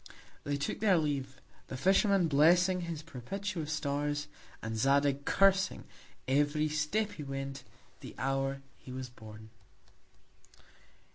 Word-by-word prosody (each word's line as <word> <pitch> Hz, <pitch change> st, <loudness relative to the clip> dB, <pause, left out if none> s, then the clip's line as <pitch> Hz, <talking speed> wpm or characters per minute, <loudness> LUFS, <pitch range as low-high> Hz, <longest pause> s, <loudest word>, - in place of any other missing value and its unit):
They 145 Hz, 0 st, -1 dB
took 140 Hz, -, -3 dB
their 200 Hz, -4 st, +4 dB
Leave; 135 Hz, -4 st, -2 dB, 0.3 s
the 130 Hz, -, -6 dB
Fisherman 195 Hz, -, +3 dB
blessing 175 Hz, +5 st, +4 dB
his 165 Hz, -3 st, -5 dB
propitious 165 Hz, -, -5 dB
Stars, 145 Hz, -1 st, -1 dB, 0.3 s
and 110 Hz, +1 st, -4 dB
Zadig 140 Hz, +3 st, +2 dB
cursing, 195 Hz, 0 st, +3 dB, 0.4 s
every 145 Hz, +3 st, +2 dB
Step 155 Hz, +8 st, 0 dB
he 150 Hz, -, -7 dB
went, 135 Hz, -1 st, -5 dB, 0.4 s
the -, -, -10 dB
Hour 135 Hz, +1 st, -1 dB, 0.2 s
he 130 Hz, -, -11 dB
was 130 Hz, 0 st, -5 dB
born. 110 Hz, -2 st, -12 dB
145 Hz, 120 wpm, -32 LUFS, 135-170 Hz, 0.4 s, their